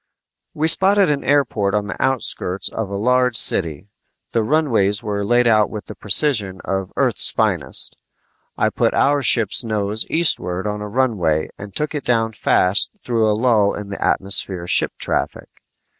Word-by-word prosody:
We 155 +1 0
spotted 195 +1 +3
an 140 -1 -2
airport 120 -8 0
on 105 -1 -1
the 105 - -7
outskirts 100 -7 -1
of 110 -3 -5
a 100 - -5
large 125 +3 +1
city. 85 -6 +1 0.5
The 115 - 0
runways 110 -6 0
were 100 -2 -3
laid 120 +4 +2
out 110 -2 +3
with 105 -2 -8
the - - -9
precision 105 -4 +1
of 95 -1 -3
Earth's - - +3
finest. - - -2 0.6
I - - +1
put - - 0
our 145 0 +2
ship's 115 -4 +3
nose 105 -1 0
eastward 95 - 0
on 105 0 -4
a 105 - -5
runway 100 -11 0
and 100 -1 -11
took 150 +1 -3
it 145 -3 -4
down 115 -2 0
fast 100 - +1
through 115 - 0
a 105 - 0
lull 110 -4 +2
in 105 -1 -8
the 100 - -5
atmosphere 95 -2 0
ship - - +1
traffic. - - -4
110 Hz, 165 wpm, -19 LUFS, 100-125 Hz, 0.6 s, spotted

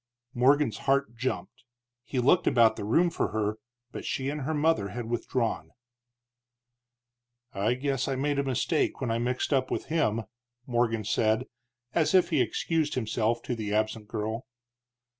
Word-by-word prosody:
Morgan's 130 -2 +3
heart 140 -3 +2
jumped. 130 +1 -4 0.4
He 130 - -5
looked 135 +8 +4
about 115 -2 +5
the - - -5
room 165 +12 +3
for - - 0
her, 110 0 -2 0.3
but - - -6
she 135 0 -2
and 150 +1 -3
her 150 +4 -2
mother 150 -9 +2
had 120 +4 -5
withdrawn. 120 0 -1 1.8
"I 105 +5 +1
guess 135 0 -1
I 135 - 0
made 140 +2 0
a - - +2
mistake 135 +4 0
when 125 -4 -1
I 115 - 0
mixed 125 +4 -1
up 130 -1 +1
with - - -2
him," 115 -9 +1 0.4
Morgan 120 -3 0
said, 110 +2 +1 0.5
as 165 +2 +2
if 185 -1 +4
he 150 -5 +3
excused 150 +6 0
himself 115 -1 0
to - - -2
the 105 -2 -2
absent 110 0 -1
girl. 110 +3 -4
125 Hz, 160 wpm, -28 LUFS, 110-140 Hz, 1.8 s, about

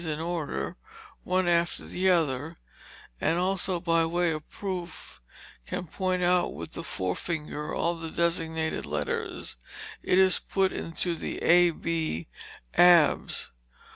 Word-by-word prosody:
's - - -5
in 155 -1 -2
order, 165 -2 -3 0.5
one 185 0 +1
after 170 0 +1
the 190 +1 0
other, 160 -2 +1 0.6
and 160 +2 +2
also 185 0 +1
by 165 -1 +2
way 170 +1 +1
of 155 -1 -5
proof, 180 - -6 0.5
can 180 - -3
point 185 +2 -1
out 180 0 +2
with - - -7
the - - -6
forefinger 150 - -3
all 170 +1 0
the 165 -1 -6
designated 160 -1 -1
letters, - - -3 0.4
it 180 - +2
is 190 -1 +5
put 195 -1 0
into 170 +1 -3
the - - -5
A 175 +1 +6
b, 160 - -2 0.5
Abs. 175 -4 +5
170 Hz, 135 wpm, -28 LUFS, 160-180 Hz, 0.6 s, A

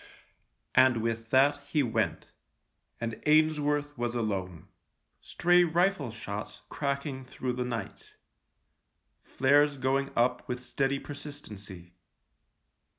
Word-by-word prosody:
And 130 -2 +5
with 115 0 -2
that 140 +3 +4
he 150 -1 +1
went, 115 -3 -1 0.7
and 115 -1 -4
Ainsworth 150 -1 +2
was 120 0 -1
alone. 95 -7 -3 0.5
Stray 175 0 +3
rifle 175 -4 +1
shots 105 -1 -7
cracking 140 -1 -3
through 130 0 -4
the 125 0 -2
night 115 -5 -6 0.5
— - - -49
flares 145 +2 +4
going 135 +1 0
up 125 +1 +1
with 125 0 -3
steady 135 +2 0
persis 145 +1 -8
tency. 95 -4 -10
130 Hz, 110 wpm, -29 LUFS, 115-145 Hz, 0.7 s, And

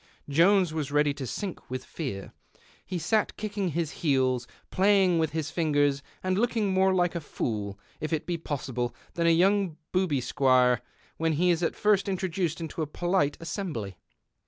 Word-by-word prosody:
Jones 170 +4 +4
was 150 -3 -3
ready 145 0 +3
to 135 -2 -6
sink 190 - -5
with 130 0 -4
fear. 130 -12 -6 0.5
He 185 - -4
sat 215 +5 0
kick 210 -1 -5
ing 200 -3 0
his 165 -1 -1
heels, 130 -5 +2 0.2
playing 190 -3 +4
with 160 -1 +1
his 155 -1 -3
fingers, 145 -4 +1 0.2
and 185 +1 +1
looking 225 -4 +1
more 190 0 +4
like 175 -2 +2
a 170 - -3
fool, 105 -8 -3 0.2
if 155 - -4
it 160 -2 -1
be 175 -2 -2
possible, 125 -6 -3 0.2
than 170 -1 +1
a - - +6
young 185 0 +3
booby 180 -7 +1
squire 125 -1 +3 0.4
when 165 0 +1
he 175 +4 +3
is 170 0 0
at 165 - +1
Mrst 210 -2 +2
introduced 180 -3 -1
into 165 0 -5
a 155 - -1
polite 175 -2 0
assembly. 155 - -4
165 Hz, 175 wpm, -28 LUFS, 140-185 Hz, 0.5 s, a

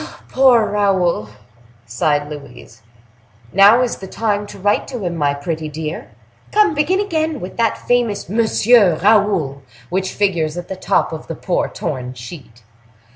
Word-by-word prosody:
"Poor 255 -4 +4
Raoul!" 190 - +1 0.6
sighed 145 +6 0
Louise. 140 -6 -11 0.7
"Now 205 +6 +6
is 245 - -2
the 190 - -9
time 205 0 -2
to - - -11
write 205 +2 0
to 245 -6 -6
him, 170 -1 -2
my 145 -3 0
pretty 155 +2 -4
dear! 155 +1 -6 0.4
Come, 420 -5 +3
begin 300 +6 +1
again, 320 -7 -1
with 180 - -8
that 230 -1 +1
famous 240 -4 0
'Monsieur 220 -2 +3
Raoul' 195 -9 +2 0.3
which 190 +1 -1
figures 175 -6 0
at 175 - -7
the 190 - -4
top 185 - 0
of 160 - -8
the 165 - -5
poor 180 - -1
torn 125 -3 -5
sheet." 120 -1 -11
190 Hz, 150 wpm, -18 LUFS, 155-225 Hz, 0.7 s, Now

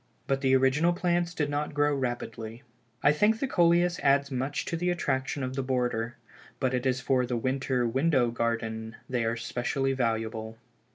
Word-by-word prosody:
But 135 0 0
the 135 -1 +4
original 135 +6 +3
plants 175 -1 0
did 150 - 0
not 145 +1 -2
grow 145 0 +3
rapidly. 120 -2 -4 0.4
I 145 - +6
think 210 +8 +3
the 275 - 0
Coleus 175 -4 +3
adds 140 0 +3
much 135 +2 -2
to - - -2
the 175 +2 0
attraction 135 -5 -1
of 130 0 -3
the 135 - 0
border, 125 -3 -1 0.4
but 130 -1 0
it 125 +1 0
is 125 -1 +1
for 130 0 +1
the 120 -1 -1
winter 130 0 0
window 130 -1 +2
garden 115 -1 -2
they 125 -2 -1
are 115 +1 0
specially 135 +3 -1
valuable." 110 -2 -2
130 Hz, 175 wpm, -28 LUFS, 120-145 Hz, 0.4 s, I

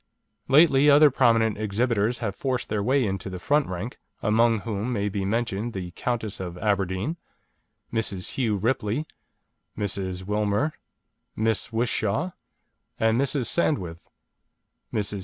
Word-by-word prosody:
Lately 145 0 +6
other 145 0 +7
prominent 115 -4 +3
exhibitors 110 +2 +1
have 100 -2 -2
forced 130 -3 -2
their 105 - 0
way 130 +4 +2
into 95 -1 -3
the 95 - -5
front 145 +11 +1
rank, 95 +7 -5 0.2
among 115 0 +3
whom 110 +2 -3
may 105 -3 0
be 100 -1 -2
mentioned 115 +1 -1
the 90 -2 -5
Countess 110 0 -3
of 90 -2 -5
Aberdeen, 100 - -1 0.8
Mrs. 100 -5 -2
Hugh 115 -6 +1
Ripley, 110 +5 0 0.7
Mrs. 95 -3 -3
Wilmer, 105 +8 0 0.6
Miss 110 +1 0
Whishaw, 115 - 0 0.7
and 110 +3 +3
Mrs. 140 -2 0
Sandwith. 95 - 0 0.9
Mrs. 105 -1 -2
110 Hz, 125 wpm, -25 LUFS, 100-125 Hz, 0.9 s, other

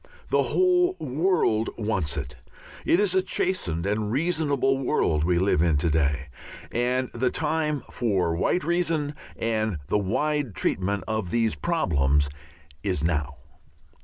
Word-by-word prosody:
The - - +3
whole 365 0 +3
world 145 - +1
wants 95 -10 -1
it. - - -5 0.5
It 170 - +4
is 205 -3 +2
a 190 - +4
chastened 180 - -1
and 105 +1 -1
reasonable 140 -2 +1
world 80 - +1
we 85 +1 +2
live 90 -4 +2
in 80 -3 +3
to 80 +2 +1
day, 75 -2 0 0.4
and 125 +2 0
the 125 +2 +1
time 150 -1 -1
for 95 -8 0
white 175 - +1
reason 165 -4 0 0.2
and 110 -4 -1
the 105 - +2
wide 145 +4 -1
treatment 100 +2 0
of 110 -4 -2
these 115 +2 +1
problems 75 - +1 0.5
is 90 -5 -1
now. 75 -4 0
110 Hz, 135 wpm, -25 LUFS, -, 0.5 s, It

